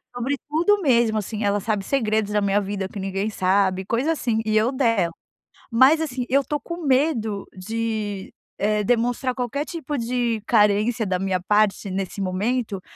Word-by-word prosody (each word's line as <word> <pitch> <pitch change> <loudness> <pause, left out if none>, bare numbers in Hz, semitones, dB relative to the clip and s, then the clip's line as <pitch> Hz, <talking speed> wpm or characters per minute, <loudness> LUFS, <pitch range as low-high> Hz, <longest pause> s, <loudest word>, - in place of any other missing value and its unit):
Sobre 260 +4 -1
tudo, 340 +8 +2
mesmo, 235 -7 +3
assim. 215 +1 -3
Ela 205 0 +1
sabe 210 0 -1
segredos 215 -3 0
da 210 0 +1
minha 200 +1 +2
vida 195 -1 -3
que 200 - -8
ninguém 195 +2 -2
sabe, 190 -1 +1
coisa 240 - 0
assim, 235 -8 0
e 215 0 0
eu 220 +3 +3
dela. 230 -10 +1 0.6
Mas, 260 +7 +5
assim, 255 -5 -3
eu 275 +3 +3
estou 295 +2 -3
com 340 +4 -7
medo 255 -7 +1
de, 215 0 -4 0.2
eh, 210 +1 +1
demonstrar 245 +3 0
qualquer 255 +3 -2
tipo 315 -4 -5
de 235 -1 -1
carência 215 +1 +3
da 185 -2 -1
minha 190 -1 0
parte 205 +1 +1
nesse 195 +1 -4
momento, 200 +2 -1
220 Hz, 165 wpm, -23 LUFS, 200-250 Hz, 0.6 s, Mas